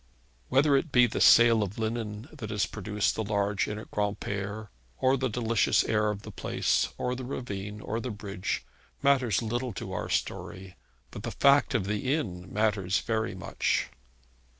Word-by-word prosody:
Whether 140 +2 +4
it 145 +2 -2
be 125 -2 +6
the 115 - -2
sale 115 -1 +7
of 100 -1 -3
linen 110 0 -3
that 120 -9 -7
has 105 -3 +1
produced 105 +2 -1
the 110 - -2
large 100 -1 0
inn 105 - -4
at 110 - -10
Granpere, 105 0 -3 0.3
or 130 +1 +3
the 130 -1 -1
delicious 115 0 +2
air 105 -1 +1
of 105 -1 -4
the - - -8
place, - - 0
or 125 - -1
the 130 +1 -5
ravine 105 -5 -5
and 115 +2 -2
the 125 - -4
bridge, 100 -4 -4 0.4
matters 130 -7 +3
little 120 +1 -2
to - - -6
our - - -3
story; 95 0 -3 0.4
but 100 - -7
the 115 - -4
fact 140 +2 +4
of 105 -6 +1
the 105 +6 -1
inn 90 - -5
matters 105 -3 +1
very 110 -3 -1
much. 90 - -1
110 Hz, 175 wpm, -28 LUFS, 100-120 Hz, 0.4 s, sale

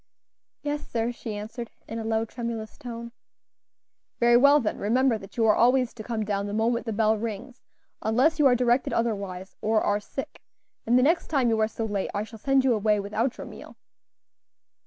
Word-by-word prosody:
"Yes, 295 0 -3
sir," 230 0 -1
she 230 -3 -6
answered, 220 +3 -6 0.2
in 225 - -5
a - - -4
low, 225 0 0
tremulous 230 -2 -5
tone. 235 -3 -8 1.1
"Very 240 0 +5
well, 280 +4 +6
then; 225 -6 -2
remember 235 +2 +2
that 195 +3 -13
you 225 - +3
are 215 - +6
always 250 0 +3
to 230 - -9
come 220 -2 -3
down 200 -1 -1
the 205 - -5
moment 235 +2 0
the - - -1
bell 215 0 +2
rings, 230 +3 -6 0.4
unless 260 +9 +2
you 290 - +6
are 250 - +5
directed 245 +1 +1
otherwise, 200 -5 -2
or 220 0 +2
are 205 0 +1
sick; 265 +6 -7 0.5
and 240 +2 +4
the 250 - +4
next 330 +5 +2
time 270 -6 +2
you 225 -1 +1
are 215 - +3
so 225 +1 -4
late, 205 -3 -2
I 205 - 0
shall 220 +1 -11
send 270 +2 +2
you 255 - +4
away 210 -1 +2
without 215 +5 -1
your - - -7
meal." - - -12
230 Hz, 200 wpm, -26 LUFS, 215-245 Hz, 1.1 s, well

